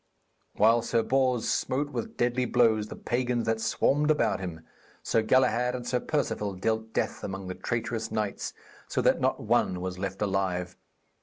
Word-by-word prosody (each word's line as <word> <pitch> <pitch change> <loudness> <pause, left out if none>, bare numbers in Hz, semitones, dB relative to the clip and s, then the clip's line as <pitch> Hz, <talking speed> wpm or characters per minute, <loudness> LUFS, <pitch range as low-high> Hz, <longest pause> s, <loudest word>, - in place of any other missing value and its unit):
While 115 +2 +5
Sir 115 0 +1
Bors 130 -2 +1
smote 145 +3 0
with 120 -4 -5
deadly 125 +1 +1
blows 115 -3 +3
the - - -8
pagans 120 -1 -1
that 110 0 0
swarmed 145 +6 +2
about 115 -11 +2
him, 85 -4 -6 0.4
Sir 115 - +2
Galahad 125 +1 +2
and 125 -1 -6
Sir 125 0 +1
Perceval 110 -10 -1
dealt 110 +3 -1
death - - -2
among 95 0 -5
the 95 - -3
traitorous 115 +1 -3
knights, 105 -2 -3 0.3
so - - -2
that - - +3
not - - +1
one 90 - +2
was 90 0 -4
left 95 +1 -3
alive. 95 -3 -1
115 Hz, 165 wpm, -28 LUFS, 100-125 Hz, 0.4 s, While